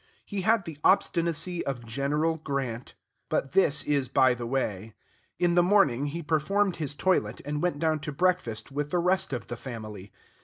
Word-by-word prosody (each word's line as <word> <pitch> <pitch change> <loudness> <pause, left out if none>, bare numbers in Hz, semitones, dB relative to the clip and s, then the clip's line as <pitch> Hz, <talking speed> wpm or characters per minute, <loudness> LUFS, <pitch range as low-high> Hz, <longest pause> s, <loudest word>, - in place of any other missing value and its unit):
He 205 -2 -3
had 215 0 +2
the 160 -3 -8
obstinacy 170 -3 +2
of 125 -4 -4
General 145 +7 0
Grant. 135 -6 -4 0.3
But 135 - -1
this 155 -5 +3
is 140 -4 0
by 130 -1 +4
the 120 -1 -5
way. 110 -5 -2 0.4
In 175 -1 +2
the 175 - +5
morning, 175 - +3
he 165 +4 -5
performed 175 +6 +1
his 145 -3 -4
toilet 135 - +1
and 150 +1 -2
went 175 -5 0
down 155 0 +1
to 150 - -5
breakfast 160 -9 0
with 145 +1 -2
the 180 - 0
rest 185 +1 +1
of 120 -6 -3
the 120 - -6
family. 110 -6 -8
145 Hz, 180 wpm, -27 LUFS, 130-175 Hz, 0.4 s, the